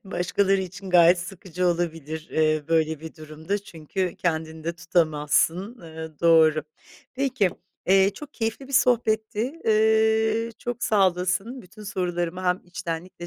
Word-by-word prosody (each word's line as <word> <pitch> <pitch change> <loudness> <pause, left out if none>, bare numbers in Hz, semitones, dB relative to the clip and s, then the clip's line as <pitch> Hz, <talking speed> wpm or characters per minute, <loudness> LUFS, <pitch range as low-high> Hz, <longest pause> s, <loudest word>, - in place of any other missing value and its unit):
başkaları 195 +1 +1
için 185 +1 -8
gayet 175 0 +6
sıkıcı 180 0 -4
olabilir, 165 -2 -2
eee, 155 -1 +2
böyle 160 -2 +1
bir 160 0 -9
durumda 155 +5 -4
çünkü 180 0 -4
kendini 160 -2 -3
de 170 - -1
tutamazsın, 170 - +1
eee, 160 -1 -8
doğru. 160 -2 +5 0.5
Peki, 260 -7 +1 0.4
eee, 195 +1 +5
çok 295 +4 -11
keyifli 225 +4 -3
bir - - -10
sohbetti. 235 +2 +1
Eee, 220 +1 +3
çok 240 -1 -4
sağ 200 -3 +4
olasın. 185 +8 -3
Bütün 200 +3 -14
sorularıma 180 -2 -3
hem 180 0 +1
içtenlikle 175 0 -6
180 Hz, 130 wpm, -25 LUFS, 165-215 Hz, 0.5 s, gayet